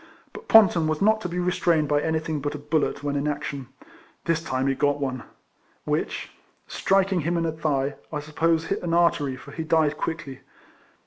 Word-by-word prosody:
But -, -, -11 dB
Ponton 185 Hz, -7 st, +6 dB
was 155 Hz, -1 st, -1 dB
not 215 Hz, +2 st, +3 dB
to 180 Hz, -, -4 dB
be 175 Hz, -, -4 dB
restrained 175 Hz, -3 st, +1 dB
by 145 Hz, 0 st, +2 dB
anything 160 Hz, -1 st, -1 dB
but 145 Hz, +1 st, -3 dB
a -, -, -4 dB
bullet 150 Hz, 0 st, -1 dB
when 145 Hz, -1 st, -1 dB
in 140 Hz, +1 st, -1 dB
action. 140 Hz, -3 st, -4 dB, 0.6 s
This 165 Hz, -1 st, +1 dB
time 130 Hz, -5 st, -2 dB
he 135 Hz, -, +2 dB
got 145 Hz, +1 st, +1 dB
one; 130 Hz, -3 st, -2 dB, 0.6 s
which, -, -, -2 dB, 0.4 s
striking 195 Hz, -2 st, +1 dB
him 170 Hz, +3 st, 0 dB
in 165 Hz, -, 0 dB
the 165 Hz, -, 0 dB
thigh, 145 Hz, -3 st, -1 dB
I 150 Hz, -, -2 dB
suppose 160 Hz, +2 st, 0 dB
hit 195 Hz, -, -2 dB
an 170 Hz, -1 st, -1 dB
artery, 150 Hz, -6 st, +2 dB
for 130 Hz, -, -12 dB
he 160 Hz, -, -4 dB
died 155 Hz, -2 st, +2 dB
quickly. 160 Hz, -5 st, -4 dB
155 Hz, 190 wpm, -25 LUFS, 145-170 Hz, 0.6 s, Ponton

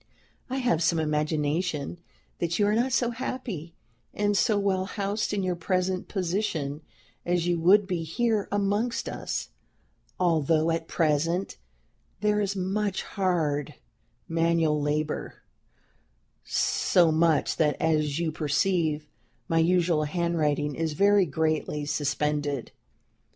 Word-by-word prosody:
"I 260 Hz, -, -2 dB
have 240 Hz, -11 st, +1 dB
some 165 Hz, 0 st, +2 dB
imagination 155 Hz, +1 st, -1 dB, 0.4 s
that 170 Hz, -1 st, -1 dB
you 205 Hz, -, +3 dB
are 205 Hz, -, +2 dB
not 240 Hz, +4 st, +1 dB
so 240 Hz, 0 st, +1 dB
happy 230 Hz, -, -5 dB, 0.4 s
and 205 Hz, 0 st, +1 dB
so 210 Hz, +1 st, +3 dB
well 195 Hz, -2 st, +1 dB
housed 205 Hz, +1 st, -2 dB
in 205 Hz, -2 st, -1 dB
your 180 Hz, -1 st, 0 dB
present 185 Hz, +1 st, -1 dB
position 170 Hz, -6 st, -2 dB, 0.4 s
as 175 Hz, -1 st, 0 dB
you 175 Hz, -1 st, +1 dB
would 195 Hz, +5 st, +5 dB
be 180 Hz, -3 st, -2 dB
here 210 Hz, +6 st, 0 dB
amongst 205 Hz, +4 st, 0 dB
us; -, -, -4 dB, 0.7 s
although 165 Hz, -2 st, +2 dB
at 165 Hz, 0 st, -2 dB
present 165 Hz, +3 st, 0 dB, 0.6 s
there 210 Hz, 0 st, +2 dB
is 200 Hz, 0 st, -1 dB
much 195 Hz, +1 st, -1 dB
hard 160 Hz, -7 st, -1 dB, 0.5 s
manual 165 Hz, -2 st, +1 dB
labor, 150 Hz, +1 st, -2 dB, 1.0 s
so 170 Hz, -3 st, +2 dB
much 160 Hz, -1 st, +2 dB
that, 150 Hz, -3 st, +1 dB
as 155 Hz, -2 st, +1 dB
you 165 Hz, -2 st, 0 dB
perceive, 155 Hz, 0 st, 0 dB, 0.4 s
my 165 Hz, -, +2 dB
usual 170 Hz, -2 st, +2 dB
handwriting 150 Hz, -3 st, 0 dB
is 160 Hz, +1 st, -2 dB
very 200 Hz, +2 st, +4 dB
greatly 155 Hz, 0 st, -1 dB
suspended. 145 Hz, -2 st, -1 dB
170 Hz, 120 wpm, -27 LUFS, 155-195 Hz, 1.0 s, would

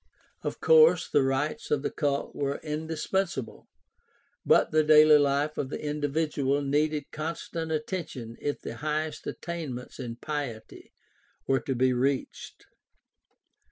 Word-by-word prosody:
Of -, -, -4 dB
course 475 Hz, 0 st, +6 dB
the -, -, +3 dB
rites 135 Hz, +3 st, -1 dB
of 145 Hz, -2 st, +1 dB
the -, -, -1 dB
cult 140 Hz, -3 st, -1 dB
were 140 Hz, -1 st, -2 dB
indispensable, 160 Hz, -1 st, -3 dB, 0.8 s
but -, -, +4 dB
the 155 Hz, 0 st, +4 dB
daily 155 Hz, 0 st, +7 dB
life 145 Hz, +1 st, +1 dB
of 130 Hz, -, -2 dB
the -, -, -5 dB
individual 145 Hz, -1 st, -1 dB
needed 150 Hz, +1 st, 0 dB
constant 160 Hz, +1 st, -4 dB
attention 150 Hz, -7 st, -4 dB
if 145 Hz, -, -2 dB
the -, -, -7 dB
highest 155 Hz, +1 st, -3 dB
attainments 150 Hz, -9 st, -6 dB
in 120 Hz, -3 st, -5 dB
piety 140 Hz, -5 st, -6 dB, 0.5 s
were 135 Hz, 0 st, +2 dB
to 135 Hz, -, -3 dB
be 130 Hz, +1 st, +3 dB
reached. 130 Hz, +2 st, -2 dB
150 Hz, 125 wpm, -28 LUFS, 135-155 Hz, 0.8 s, daily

